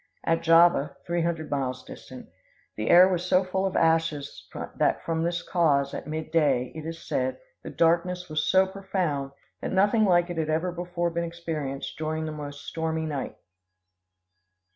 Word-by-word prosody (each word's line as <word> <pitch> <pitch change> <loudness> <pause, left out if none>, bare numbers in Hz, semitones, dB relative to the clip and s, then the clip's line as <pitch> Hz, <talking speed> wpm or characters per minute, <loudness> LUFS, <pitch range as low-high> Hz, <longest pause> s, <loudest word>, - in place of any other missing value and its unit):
At 165 0 +1
Java, 165 -4 +4
three 170 0 0
hundred 165 -2 -2
miles 130 -3 -2
distant, - - -11 0.5
the 110 +1 -3
air 180 +1 +8
was 180 -2 -1
so 185 +1 +3
full 190 +1 -1
of 190 - -5
ashes 160 -3 0 0.3
that - - +1
from 165 -1 -1
this 170 +1 -1
cause, 140 -6 +2
at - - -6
mid 155 +1 -5
day, 135 -6 +2
it 160 0 -7
is 165 0 -5
said, 130 0 -1 0.2
the - - -8
darkness 180 +2 +1
was 155 -1 -1
so 190 0 +4
profound 185 -8 -2 0.3
that - - -3
nothing 205 +4 +3
like 175 -2 +3
it 170 - -3
had 155 -1 -1
ever 165 +3 0
before 175 0 -2
been 170 +1 -2
experienced 160 -6 -5
during 155 0 -2
the 155 - -4
most 145 -1 -8
stormy 160 0 -2
night. 145 -4 -4
165 Hz, 170 wpm, -26 LUFS, 150-175 Hz, 0.5 s, air